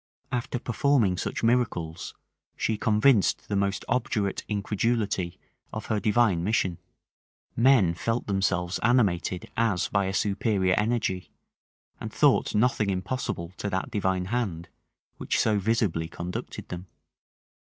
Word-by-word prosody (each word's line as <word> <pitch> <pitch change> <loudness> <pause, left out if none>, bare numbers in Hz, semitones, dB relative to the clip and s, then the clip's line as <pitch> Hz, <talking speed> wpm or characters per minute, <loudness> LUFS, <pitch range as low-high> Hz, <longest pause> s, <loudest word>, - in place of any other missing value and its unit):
After 125 0 -2
performing 120 -4 +2
such - - -3
miracles, 110 -9 0 0.4
she 110 - 0
convinced 110 +1 +3
the 105 - 0
most 100 0 0
obdurate 105 -5 -1
incredulity 105 -3 -1 0.3
of - - -5
her 105 - +1
divine 105 -5 +2
mission: 95 -3 0 0.8
men 115 -8 +5
felt 115 +7 -2
themselves 95 -3 0
animated 100 -7 +1
as 110 -6 +1
by 100 -1 +1
a 95 - -2
superior 100 -2 +1
energy, 105 -4 -1 0.7
and - - -6
thought - - +3
nothing 110 -2 +2
impossible 95 -3 -3
to 100 - -3
that 95 -1 -2
divine 95 -3 0
hand 90 -9 -2 0.5
which - - -1
so 105 -2 +2
visibly 100 -6 0
conducted 85 +1 -6
them. 90 +1 -6
100 Hz, 125 wpm, -27 LUFS, 90-115 Hz, 0.8 s, men